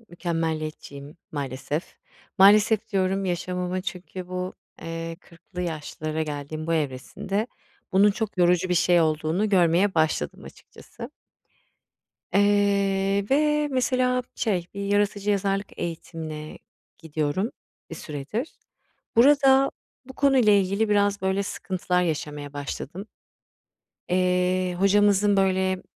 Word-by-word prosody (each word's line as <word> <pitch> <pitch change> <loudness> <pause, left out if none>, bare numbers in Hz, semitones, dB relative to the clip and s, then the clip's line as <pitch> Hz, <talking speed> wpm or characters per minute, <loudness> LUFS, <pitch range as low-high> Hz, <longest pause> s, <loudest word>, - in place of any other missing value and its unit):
mükemmeliyetçiyim 160 -4 -4 0.2
maalesef. 145 +3 -4 0.4
Maalesef, 210 +3 +5
diyorum 195 0 +1
yaşamıma 180 0 -2
çünkü 180 -1 -7
bu, 185 0 -4 0.3
eee, 165 0 -5
40'lı 175 0 -9
yaşlara 155 -1 -4
geldiğim 150 +1 -5
bu 165 - +1
evresinde 160 - -2 0.5
bunun 200 +2 +5
çok 210 -1 -4
yorucu 180 +1 +3
bir 180 - +1
şey 175 0 +4
olduğunu 160 +5 +1
görmeye 185 0 +3
başladım 155 - 0
açıkçası. - - -12 1.2
Eee, 200 0 +2
ve 300 +1 +2
mesela 255 -1 +1
şey 185 -7 -1
bir 200 - -5
yaratıcı 205 0 +1
yazarlık 195 0 -1
eğitimine 160 -2 -6 0.4
gidiyorum 160 - -2 0.4
bir - - -5
süredir. 155 - -5 0.6
Burada 270 +1 +5 0.3
bu 265 - -11
konuyla 260 -6 +4
ilgili 200 +2 +2
biraz 205 -1 +2
böyle 190 +1 +1
sıkıntılar 180 -2 -2
yaşamaya 150 -3 -3
başladım. 145 +6 -6 1.0
Eee, 180 0 +1
hocamızın 205 +1 +4
böyle, 190 -1 +1
185 Hz, 105 wpm, -25 LUFS, 165-205 Hz, 1.2 s, Maalesef